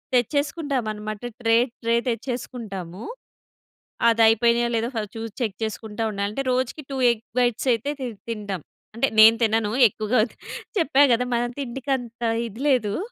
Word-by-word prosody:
తెచ్చేసుకుంటామన్నమాట. 245 Hz, -6 st, -1 dB, 0.2 s
Tray 225 Hz, 0 st, +4 dB, 0.3 s
tray 230 Hz, 0 st, +2 dB
తెచ్చేసుకుంటాము. 225 Hz, -6 st, -5 dB, 1.1 s
అది 230 Hz, 0 st, +2 dB
అయిపోయినాయో 235 Hz, +1 st, +3 dB
లేదో 230 Hz, +2 st, -1 dB
first 210 Hz, -1 st, -4 dB
చూసి 225 Hz, -1 st, -5 dB
చెక్ 215 Hz, -4 st, -1 dB
చేసుకుంటా 220 Hz, 0 st, -4 dB
ఉండాలి. 200 Hz, 0 st, -2 dB
అంటే 275 Hz, +5 st, -3 dB
రోజుకి 255 Hz, +4 st, -1 dB
టూ 270 Hz, -, -3 dB
ఎగ్ 230 Hz, -1 st, -5 dB, 0.2 s
బైట్స్ 245 Hz, +1 st, +1 dB
అయితే 230 Hz, +5 st, -2 dB
తి 255 Hz, -, -2 dB, 0.2 s
తింటాం. 205 Hz, -5 st, -4 dB, 0.3 s
అంటే 270 Hz, +3 st, +2 dB
నేను 225 Hz, +1 st, +9 dB
తినను. 220 Hz, -1 st, +1 dB, 0.2 s
ఎక్కువగా 215 Hz, +4 st, 0 dB
తి -, -, -23 dB, 0.4 s
చెప్పా 285 Hz, -3 st, +3 dB
కదా! 240 Hz, +2 st, +2 dB
మనం 240 Hz, +1 st, 0 dB
తిండికంత 250 Hz, -2 st, -4 dB, 0.3 s
ఇది 225 Hz, +5 st, -10 dB
లేదు. 220 Hz, -7 st, +1 dB
230 Hz, 140 wpm, -24 LUFS, 215-250 Hz, 1.1 s, నేను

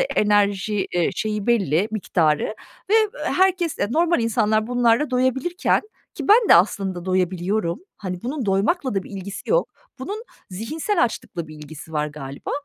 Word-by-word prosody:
enerji, 205 Hz, -, +1 dB
eee, 175 Hz, -1 st, +1 dB
şeyi 210 Hz, +1 st, -2 dB
belli, 200 Hz, -, +2 dB
miktarı 170 Hz, -7 st, +1 dB, 0.5 s
ve, -, -, +4 dB
eee, 440 Hz, -1 st, +5 dB, 0.2 s
herkes, 370 Hz, -3 st, +1 dB
normal 335 Hz, +2 st, +2 dB
insanlar 220 Hz, -1 st, +1 dB
bunlarla 245 Hz, +3 st, +2 dB
doyabilirken, 260 Hz, -, +1 dB, 0.3 s
ki -, -, -6 dB
ben 435 Hz, +2 st, +6 dB
de -, -, +9 dB
aslında 185 Hz, -1 st, +2 dB
doyabiliyorum. 185 Hz, -, 0 dB, 0.2 s
Hani, 180 Hz, -3 st, -6 dB
bunun 260 Hz, -1 st, -3 dB
doymakla 215 Hz, -, +1 dB
da 195 Hz, -, 0 dB
bir -, -, -13 dB
ilgisi 195 Hz, -1 st, -7 dB
yok. -, -, +3 dB, 0.3 s
Bunun 410 Hz, -, -5 dB, 0.3 s
zihinsel 305 Hz, -, -1 dB
açlıkla 175 Hz, -7 st, -5 dB
bir 155 Hz, -, -10 dB
ilgisi 150 Hz, +1 st, -11 dB
var 150 Hz, -1 st, 0 dB
galiba. 140 Hz, -2 st, -7 dB
210 Hz, 145 wpm, -22 LUFS, 180-265 Hz, 0.5 s, de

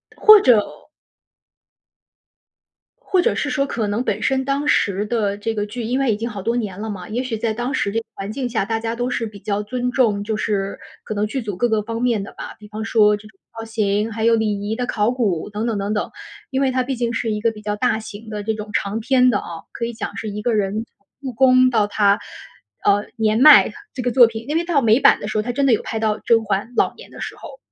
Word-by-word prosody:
或 430 Hz, -1 st, +8 dB
者 240 Hz, -, +5 dB, 2.4 s
或 375 Hz, -6 st, +1 dB
者 -, -, +1 dB
是 -, -, -1 dB
说 275 Hz, -1 st, 0 dB
可 230 Hz, -6 st, -2 dB
能 210 Hz, +4 st, -1 dB
本 -, -, -2 dB
身 265 Hz, 0 st, +1 dB
当 280 Hz, +2 st, -1 dB
时 200 Hz, -6 st, +1 dB
的 210 Hz, -3 st, -1 dB
这 225 Hz, +2 st, -3 dB
个 205 Hz, -, -1 dB
剧， 235 Hz, +3 st, -6 dB
因 245 Hz, +4 st, -1 dB
为 265 Hz, -4 st, +2 dB
已 -, -, -3 dB
经 230 Hz, +2 st, -3 dB
好 205 Hz, -3 st, -6 dB
多 230 Hz, +5 st, -1 dB
年 205 Hz, -5 st, -4 dB
了 220 Hz, -, -4 dB
嘛， 195 Hz, -4 st, -6 dB
也 240 Hz, +4 st, -2 dB
许 235 Hz, -4 st, -3 dB
在 220 Hz, 0 st, -1 dB
当 240 Hz, +5 st, -3 dB
时 200 Hz, -9 st, 0 dB
这 225 Hz, -, 0 dB
个 225 Hz, -, -11 dB
环 195 Hz, +2 st, -6 dB
境 250 Hz, +1 st, -3 dB
下， 225 Hz, -4 st, -1 dB
大 225 Hz, +1 st, -1 dB
家 225 Hz, +1 st, -3 dB
都 245 Hz, +1 st, -2 dB
是 235 Hz, -2 st, -2 dB
比 210 Hz, -1 st, -12 dB
较 205 Hz, +1 st, -2 dB
尊 250 Hz, +3 st, -2 dB
重， 220 Hz, -6 st, +1 dB
就 215 Hz, +1 st, -2 dB
是 200 Hz, -2 st, -2 dB, 0.2 s
可 -, -, -5 dB
能 205 Hz, +1 st, 0 dB
剧 265 Hz, +5 st, -3 dB
组 205 Hz, -5 st, -5 dB
各 240 Hz, +6 st, +1 dB
个 220 Hz, -1 st, +1 dB
方 230 Hz, +2 st, -5 dB
面 235 Hz, -5 st, +1 dB
的 200 Hz, -, -10 dB
吧。 -, -, -8 dB
比 210 Hz, -, -13 dB
方 215 Hz, +1 st, -6 dB
说 215 Hz, -2 st, +4 dB
这 210 Hz, +1 st, -12 dB
种 195 Hz, -3 st, -22 dB, 0.2 s
造 225 Hz, -, -5 dB
型， 215 Hz, -1 st, -1 dB
还 220 Hz, +1 st, -2 dB
有 230 Hz, 0 st, +5 dB
礼 210 Hz, -2 st, -1 dB
仪 220 Hz, -, -1 dB
的 250 Hz, +1 st, -2 dB
考 215 Hz, -1 st, 0 dB
古 210 Hz, -8 st, -1 dB
等 210 Hz, +2 st, -3 dB
等 230 Hz, -3 st, -1 dB
等 200 Hz, +1 st, -2 dB
等。 210 Hz, -, -2 dB, 0.4 s
因 270 Hz, +1 st, -1 dB
为 265 Hz, -, +2 dB
它 255 Hz, 0 st, 0 dB
毕 265 Hz, +1 st, -3 dB
竟 235 Hz, -1 st, -2 dB
是 230 Hz, -1 st, -1 dB
一 210 Hz, -, -2 dB
个 230 Hz, +1 st, +2 dB
比 215 Hz, -1 st, -12 dB
较 210 Hz, 0 st, -2 dB
大 220 Hz, 0 st, +1 dB
型 220 Hz, 0 st, -10 dB
的 210 Hz, -1 st, -5 dB
这 220 Hz, -, -1 dB
种 210 Hz, -1 st, -7 dB
长 205 Hz, +3 st, -1 dB
篇 255 Hz, +2 st, +3 dB
的 205 Hz, -5 st, +1 dB
啊， 165 Hz, -1 st, -8 dB
可 230 Hz, -, -4 dB
以 235 Hz, -, -5 dB
讲 -, -, -6 dB
是 220 Hz, -, -4 dB
一 210 Hz, +1 st, -5 dB
个 235 Hz, +2 st, 0 dB
人 210 Hz, +1 st, 0 dB
从 200 Hz, -, -40 dB, 0.2 s
入 265 Hz, -2 st, -4 dB
宫 255 Hz, +1 st, +5 dB
到 220 Hz, -4 st, +2 dB
她， 205 Hz, -1 st, +2 dB, 0.6 s
呃， 205 Hz, +1 st, +3 dB
年 220 Hz, 0 st, +1 dB
迈 300 Hz, +3 st, +8 dB, 0.2 s
这 260 Hz, -, -4 dB
个 245 Hz, -, 0 dB
作 245 Hz, -1 st, +7 dB
品， 225 Hz, 0 st, -7 dB
因 310 Hz, -, +1 dB
为 335 Hz, -, 0 dB
到 330 Hz, -5 st, +2 dB
美 230 Hz, +1 st, +4 dB
版 -, -, +5 dB
的 -, -, -4 dB
时 215 Hz, -, -2 dB
候， -, -, +2 dB
它 240 Hz, +3 st, -3 dB
真 280 Hz, +2 st, +1 dB
的 270 Hz, -, +4 dB
有 220 Hz, -, +1 dB
拍 220 Hz, -, -4 dB
到 215 Hz, -1 st, 0 dB
甄 225 Hz, -1 st, +2 dB
嬛 205 Hz, +3 st, -2 dB
老 -, -, +2 dB
年 -, -, -13 dB
的 -, -, -10 dB
时 -, -, -5 dB
候。 -, -, -11 dB
220 Hz, 285 characters per minute, -20 LUFS, 210-245 Hz, 2.4 s, 或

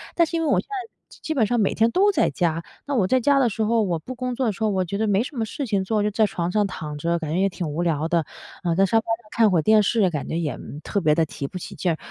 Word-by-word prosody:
但 335 Hz, -2 st, +4 dB
是 335 Hz, -, -4 dB
因 325 Hz, -, 0 dB
为 -, -, 0 dB
我 -, -, +3 dB
现 -, -, -6 dB
在 405 Hz, 0 st, -6 dB, 0.2 s
基 -, -, -16 dB
基 315 Hz, -, -2 dB
本 225 Hz, -5 st, +3 dB
上 240 Hz, 0 st, +1 dB
每 200 Hz, -, +2 dB
天 225 Hz, +1 st, +3 dB
都 400 Hz, +3 st, +4 dB
在 -, -, +2 dB
家。 165 Hz, -2 st, -1 dB, 0.2 s
那 285 Hz, -, -1 dB
我 200 Hz, -6 st, +3 dB
在 260 Hz, -, +3 dB
家 280 Hz, +3 st, +3 dB
的 255 Hz, -, +4 dB
时 220 Hz, -, -4 dB
候， 225 Hz, +1 st, +2 dB
我 175 Hz, -5 st, -1 dB
不 255 Hz, +9 st, -8 dB
工 250 Hz, 0 st, -3 dB
作 260 Hz, -, -1 dB
的 220 Hz, -, +2 dB
时 220 Hz, +3 st, -5 dB
候， 215 Hz, -, +3 dB
我 190 Hz, -1 st, +1 dB
觉 185 Hz, +3 st, -4 dB
得 220 Hz, -, 0 dB
没 200 Hz, +1 st, +3 dB
什 270 Hz, -, -9 dB
么 225 Hz, -, 0 dB
事 275 Hz, +5 st, -4 dB
情 200 Hz, -3 st, 0 dB
做， 210 Hz, +2 st, 0 dB
就 210 Hz, -, +1 dB
在 215 Hz, +1 st, +3 dB
床 175 Hz, -3 st, -2 dB
上 210 Hz, 0 st, +2 dB
躺 150 Hz, -5 st, -6 dB
着， 170 Hz, +3 st, 0 dB
感 155 Hz, -2 st, -4 dB
觉 175 Hz, -, 0 dB
也 195 Hz, +1 st, +3 dB
挺 180 Hz, -3 st, -4 dB
无 155 Hz, +4 st, -2 dB
聊 160 Hz, -2 st, 0 dB
的。 165 Hz, -2 st, +1 dB, 0.4 s
呃， 170 Hz, -1 st, +1 dB
在 195 Hz, -, +4 dB
沙 225 Hz, -, +3 dB
发 -, -, -6 dB, 0.2 s
上 215 Hz, -, -22 dB
看 220 Hz, -3 st, +3 dB
会 170 Hz, -, +3 dB
儿 -, -, +2 dB
电 215 Hz, +3 st, +5 dB
视， 205 Hz, -2 st, +2 dB
感 150 Hz, -4 st, -4 dB
觉 165 Hz, -, -2 dB
也， 155 Hz, -4 st, -2 dB
嗯， 150 Hz, -, -9 dB
特 200 Hz, -, -1 dB
别 150 Hz, -2 st, +3 dB
地 165 Hz, -, +3 dB
提 140 Hz, -2 st, -6 dB
不 185 Hz, -, -7 dB
起 -, -, -8 dB
劲 180 Hz, -, 0 dB
儿。 -, -, -6 dB
200 Hz, 365 characters per minute, -23 LUFS, 170-230 Hz, 0.4 s, 电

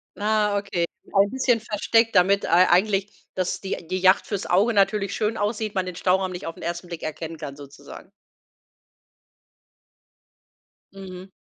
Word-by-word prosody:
Ah. 210 Hz, -1 st, +1 dB
Okay. 180 Hz, -4 st, -1 dB, 0.3 s
Ein 200 Hz, 0 st, +4 dB
bisschen 255 Hz, -1 st, +1 dB
versteckt, 225 Hz, +2 st, +1 dB
damit 195 Hz, +2 st, +4 dB
ei 175 Hz, +2 st, +5 dB
eigentlich, 195 Hz, +2 st, +1 dB
dass 185 Hz, -1 st, -2 dB
die 190 Hz, -3 st, -5 dB
die 185 Hz, -, -2 dB
Yacht 185 Hz, +1 st, +4 dB
fürs 200 Hz, -3 st, -3 dB
Auge 205 Hz, +6 st, +2 dB
natürlich 200 Hz, -1 st, +1 dB
schön 215 Hz, +1 st, -1 dB
aussieht, 210 Hz, 0 st, -2 dB
man 190 Hz, -1 st, 0 dB
den 180 Hz, -1 st, -6 dB
Stauraum 185 Hz, +1 st, +1 dB
nicht 180 Hz, 0 st, -7 dB
auf 165 Hz, -, -6 dB
'n -, -, -12 dB
1. 175 Hz, +1 st, -4 dB
Blick 170 Hz, -2 st, -7 dB
erkennen 160 Hz, +1 st, -5 dB
kann 145 Hz, -3 st, -7 dB
sozusagen. 145 Hz, +5 st, -13 dB, 2.8 s
Mhm. 190 Hz, -1 st, -10 dB
190 Hz, 150 wpm, -24 LUFS, 180-210 Hz, 2.8 s, ei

